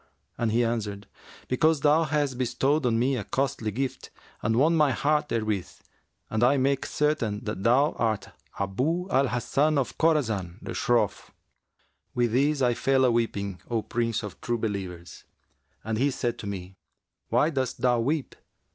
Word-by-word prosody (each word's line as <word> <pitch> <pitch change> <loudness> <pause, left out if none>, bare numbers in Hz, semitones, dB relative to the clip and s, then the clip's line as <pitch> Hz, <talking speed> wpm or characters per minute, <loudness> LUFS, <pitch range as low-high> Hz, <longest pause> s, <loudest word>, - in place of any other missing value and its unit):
and 115 -2 0
he 120 +2 +3
answered, 105 -3 -3 0.4
'Because 155 +4 +2
thou 155 +3 +4
hast 145 -2 0
bestowed 130 +3 +1
on 115 -2 +2
me 130 +3 +2
a 115 - -3
costly 130 -4 -1
gift 130 +5 -4 0.3
and 110 +1 +1
won 155 +7 +4
my 150 -3 +4
heart 150 +2 +1
therewith, 110 -5 -1 0.6
and 110 +1 0
I 135 +3 +5
make 135 +1 +1
certain 130 -9 0
that 105 -3 -4
thou 130 +8 +4
art 110 -3 0 0.3
Abu 130 - -1
al 135 +1 +3
Hasan 140 +5 +1
of 135 - -1
Khorasan 110 - +1
the - - -6
Shroff.' 115 -4 0 0.9
With 120 -2 +2
this 140 +3 +2
I 120 -1 +3
fell 135 +2 +2
aweeping, 105 -6 0
O 115 -3 0
Prince 115 -2 -1
of 105 -3 -8
True 120 -1 -1
Believers; 95 -6 -5 0.6
and 110 0 -2
he 140 +3 +3
said 120 -3 -2
to 105 - -6
me, 95 -1 -6 0.5
'Why 155 - +3
dost 130 -4 -2
thou 125 -1 +3
weep? 140 +4 -1
120 Hz, 160 wpm, -27 LUFS, 110-140 Hz, 0.9 s, I